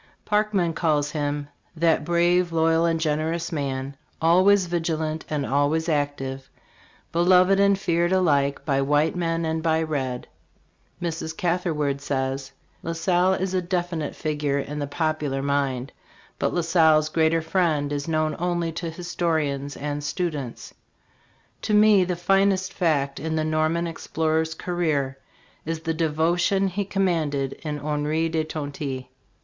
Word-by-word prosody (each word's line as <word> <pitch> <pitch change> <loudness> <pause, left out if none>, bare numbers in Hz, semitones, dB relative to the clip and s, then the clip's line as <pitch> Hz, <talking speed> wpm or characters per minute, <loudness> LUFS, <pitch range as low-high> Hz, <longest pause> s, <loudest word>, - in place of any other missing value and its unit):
Parkman 210 -5 +1
calls 150 -3 +1
him, 145 -1 -2
" - - -43
That 165 -1 +2
brave, 175 +2 +2
loyal 165 0 +3
and 165 -1 +1
generous 160 +2 -1
man, 140 -3 -3 0.2
always 185 +4 +5
vig 170 -1 -2
ilant 160 -1 -2
and 150 -2 -1
always 145 +4 +1
active, 145 -3 -2 0.6
beloved 180 +3 +4
and 200 0 +4
feared 170 -2 +1
alike 145 -7 +2
by 135 -2 +1
white 145 +4 +2
man 165 -1 -1
and 160 0 -1
by 160 0 +1
red." 130 -5 -3 0.7
Mrs. 160 -2 -4
Catherwood* 165 -6 0
says: 135 -1 -2 0.3
"La 165 - -3
Salle 180 +2 +2
is 190 0 -2
a 185 - +1
definite 175 -4 -2
figure 150 -2 -1
in 145 +1 -4
the 145 - -2
popular 150 -3 -1
mind 140 -2 -1 0.5
But - - +1
La 175 - 0
Salle's 160 -2 +4
greater 160 0 +2
friend 160 -4 +1
is 145 +1 -3
known 155 -1 0
only 175 -1 -1
to 165 +1 -4
historians 160 -5 -2
and 145 0 -4
students. 145 -5 -4 0.9
To 210 - +1
me 210 -3 +6
the 180 0 -1
finest 195 +1 +2
fact 140 -6 0
in 160 +2 -2
the 155 0 0
Norman 155 +2 +1
explorer's 160 -1 -1
career 150 -7 -1 0.4
is 160 0 -4
the 165 0 -1
devotion 170 +5 +1
he 200 +2 -2
com 195 0 0
manded 145 -6 0
in 150 -2 -3
Henri 150 +2 -1
de 160 -1 0
Tonty. 145 -4 -5
160 Hz, 145 wpm, -24 LUFS, 145-175 Hz, 0.9 s, me